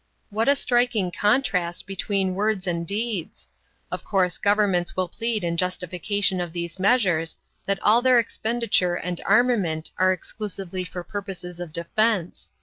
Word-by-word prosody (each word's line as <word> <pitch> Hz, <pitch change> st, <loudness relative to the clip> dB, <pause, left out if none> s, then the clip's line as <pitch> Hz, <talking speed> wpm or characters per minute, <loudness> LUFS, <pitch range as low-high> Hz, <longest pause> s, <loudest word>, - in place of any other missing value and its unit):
What 220 Hz, +5 st, +1 dB
a 285 Hz, -, +5 dB
striking 240 Hz, -8 st, +1 dB
contrast 200 Hz, -5 st, +1 dB
between 195 Hz, 0 st, -1 dB
words 205 Hz, 0 st, 0 dB
and 170 Hz, -2 st, -2 dB
deeds! 205 Hz, -3 st, -3 dB, 0.4 s
Of -, -, -4 dB
course 185 Hz, -4 st, 0 dB
governments 200 Hz, -4 st, +2 dB
will 185 Hz, -1 st, 0 dB
plead 225 Hz, +2 st, -2 dB
in 170 Hz, -1 st, -1 dB
justification 185 Hz, +2 st, 0 dB
of 175 Hz, -2 st, -5 dB
these 170 Hz, 0 st, -5 dB
measures 185 Hz, -6 st, +2 dB, 0.3 s
that 195 Hz, 0 st, +1 dB
all 220 Hz, +3 st, +5 dB
their 255 Hz, 0 st, +5 dB
expenditure 225 Hz, -5 st, +1 dB
and 180 Hz, 0 st, -3 dB
armament 195 Hz, -11 st, +2 dB
are 185 Hz, 0 st, +5 dB
exclusively 185 Hz, -1 st, -4 dB
for 180 Hz, 0 st, -6 dB
purposes 185 Hz, -3 st, -7 dB
of 175 Hz, -3 st, -6 dB
defense. 180 Hz, +3 st, 0 dB
190 Hz, 145 wpm, -24 LUFS, 175-215 Hz, 0.4 s, a